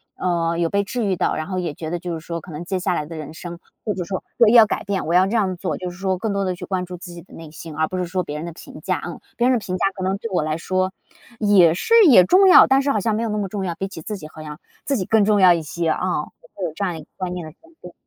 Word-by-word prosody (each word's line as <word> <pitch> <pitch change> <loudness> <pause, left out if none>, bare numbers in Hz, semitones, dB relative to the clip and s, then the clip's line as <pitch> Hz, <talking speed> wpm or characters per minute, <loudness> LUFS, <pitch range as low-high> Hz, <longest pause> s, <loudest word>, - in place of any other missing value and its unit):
嗯， 170 -2 -1
有 170 -1 +1
被 200 +2 +1
治 235 +3 -3
愈 195 -2 +1
到。 - - 0
然 155 - -3
后 185 -1 -2
也 170 -4 -3
觉 160 +1 -6
得 175 - -2
就 175 0 -5
是 165 - -4
说 170 -1 -4
可 175 - -12
能 155 +2 -6
接 190 +1 -2
下 180 - 0
来 150 - -2
的 165 +2 -9
人 155 0 -7
生， 170 +1 -8 0.3
或 210 - 0
者 180 -1 -4
说 190 +2 -5 0.2
对， 225 -2 +6
要 230 -2 +8
改 - - -3
变， 200 -2 -2
我 165 - 0
要 180 +1 +5
这 200 - -4
样 190 -5 0
做， 180 +1 -3
就 180 - -5
是 175 - -13
说 190 0 -1
更 205 +3 -2
多 200 0 0
地 185 -1 -1
去 - - -8
关 185 -2 -2
注 180 0 -8
自 175 0 -10
己 170 - -9
的 175 - -19
内 165 -2 -10
心， 160 0 -9
而 160 +1 +1
不 185 - -5
是 180 - -1
说 180 +1 -2
别 150 -2 -6
人 155 - -5
的 170 - -6
评 - - -12
价， - - -2
嗯。 - - -7 0.2
别 240 - +3
人 255 -1 +3
的 - - -2
评 185 - -3
价 175 - 0
可 190 - -5
能 190 +1 0
对 230 +3 -6
我 180 - +1
来 155 0 -2
说， 185 +2 -1 0.5
也 195 -6 +5
是 195 - -1 0.2
也 210 -9 +8
重 385 - +5
要， - - +9
但 270 +1 +4
是 280 0 0
好 215 - +1
像 215 +2 0
没 225 - -1
有 230 - -2
那 210 - -2
么 205 -2 -2
重 195 0 -3
要， 175 - -2
比 195 - -4
起 190 -4 -9
自 210 +6 -5
己， 155 - -9
好 155 0 -11
像 150 -1 -9 0.3
自 275 -1 0
己 185 - -2
更 220 0 +3
重 210 -1 +3
要 180 -1 +8
一 170 - -1
些， 165 +2 -2
嗯， 180 -2 -1 0.3
会 190 - -4
有 165 - -3
这 200 - -2
样 180 -3 -2
一 - - -8
个 150 - -16
观 185 -1 -3
念 175 -2 -5
的 155 - -9
转 330 +1 -22
变。 180 - -11
185 Hz, 360 characters per minute, -21 LUFS, 170-200 Hz, 0.5 s, 要